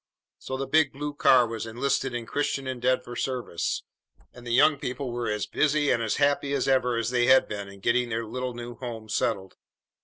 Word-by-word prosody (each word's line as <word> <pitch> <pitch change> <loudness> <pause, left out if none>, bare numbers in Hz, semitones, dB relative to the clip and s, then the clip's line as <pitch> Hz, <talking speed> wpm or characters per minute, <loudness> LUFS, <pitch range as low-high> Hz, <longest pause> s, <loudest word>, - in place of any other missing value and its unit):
So 130 - -5
the 135 - -2
big 155 0 +3
blue 145 +2 -4
car 130 -3 +5
was 115 -1 -5
enlisted 130 +2 -1
in 120 -1 -4
Christian 140 +1 -2
Endeavor 125 -1 -1
service, 125 -10 -2 0.5
and 120 -1 -12
the - - -3
young 140 +4 +5
people 125 0 -4
were 120 -1 -2
as 105 -1 -1
busy 150 -1 +1
and 120 - +1
as 110 -2 0
happy 145 0 +1
as 140 - 0
ever 125 -3 +2
they 120 +1 +1
had 130 0 +6
been 100 -1 -5
in 100 0 -13
getting 120 +3 +1
their 115 0 -2
little 125 +2 -4
new 120 0 -7
home 115 -3 -7
settled. 100 -4 -1
125 Hz, 195 wpm, -26 LUFS, 115-135 Hz, 0.5 s, had